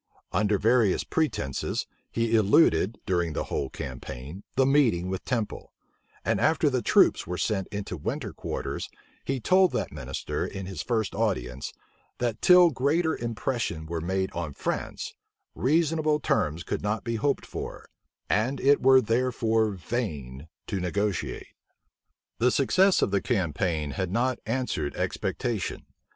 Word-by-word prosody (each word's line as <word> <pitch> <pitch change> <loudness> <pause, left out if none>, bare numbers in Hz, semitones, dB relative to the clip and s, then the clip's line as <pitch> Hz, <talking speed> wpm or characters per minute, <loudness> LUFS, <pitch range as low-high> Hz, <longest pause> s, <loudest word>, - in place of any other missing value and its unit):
Under 105 +2 +2
various 110 -1 +3
pretences, 145 - -1 0.2
he 115 0 +1
eluded, 105 - +4
during 85 -5 0
the - - -1
whole 70 - -3
campaign, 65 +5 -7
the 130 - +4
meeting 125 -11 +3
with 95 0 -3
Temple; 115 -5 -3 0.5
and - - +1
after - - +3
the - - +1
troops - - +4
were 90 +1 -3
sent 95 -2 -1
into 100 -3 -5
winter 75 - -4
quarters, - - -4 0.3
he 135 -1 -2
told 185 - +4
that - - -2
minister, - - -4
in 95 -1 -5
his 95 0 -5
first 110 -4 -1
audience, 65 - -2 0.5
that 120 -2 -2
till 180 -2 +7
greater 155 +5 +1
impression 115 -7 -2
were 85 0 -3
made 95 +2 -1
on 85 -4 -4
France, - - -3 0.4
reasonable 155 +1 +2
terms 85 - 0
could - - -3
not 105 +2 -1
be 115 -2 -2
hoped 140 +5 0
for; - - -7 0.4
and 125 +6 +1
it 140 +1 +4
were 130 0 +7
therefore 115 -1 +1
vain 85 - -4 0.2
to 100 - -2
negotiate. 95 +2 -2 0.9
The 125 - +4
success 185 +9 +3
of - - +1
the 100 -1 +2
campaign 85 - -1
had 95 +4 -2
not 120 +5 0
answered 115 - -1
expectation. 115 -6 -2
110 Hz, 140 wpm, -27 LUFS, 90-130 Hz, 0.9 s, till